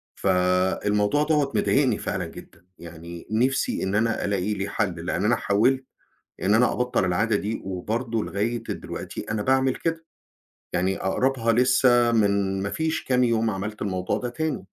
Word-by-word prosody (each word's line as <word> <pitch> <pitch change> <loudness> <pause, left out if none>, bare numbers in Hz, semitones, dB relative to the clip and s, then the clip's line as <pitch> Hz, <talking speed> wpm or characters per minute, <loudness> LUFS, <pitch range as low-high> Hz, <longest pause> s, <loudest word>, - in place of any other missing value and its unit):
فالموضوع 95 +7 +1
دَوّة 150 -3 +1
مضايقني 130 -6 +2
فعلًا - - -3
جدًا، 85 - -13
يعني 85 0 -10
نفْسي 130 +5 +1
إن 95 +2 -1
أنا 115 0 +1
ألاقي 100 +1 -1
لي 100 +1 -3
حل، 90 -6 -2
لأن 95 +2 -1
أنا 120 - +4
حاولت 130 +6 +1 0.6
إن 100 +2 +3
أنا 125 +2 +4
أبطّل 125 0 0
العادة 105 +5 +1
دي، 105 +2 -2
وبرضه 110 +5 -2
لغاية 110 +6 -2
دلوقتي - - -6
أنا 105 -1 -1
باعمل 130 0 +2
كده، 165 -1 -3 0.7
يعني 95 +2 0
أقربها 115 +3 +1
لسّه 120 -1 +4
من 100 -3 +1
ما 100 - -2
فيش 160 0 -2
كام 125 -1 +2
يوم 115 -1 +2
عملت 105 +2 -5
الموضوع 95 -3 -1
ده 125 - -3
تاني. 150 -5 -3
110 Hz, 155 wpm, -24 LUFS, 95-125 Hz, 0.7 s, أنا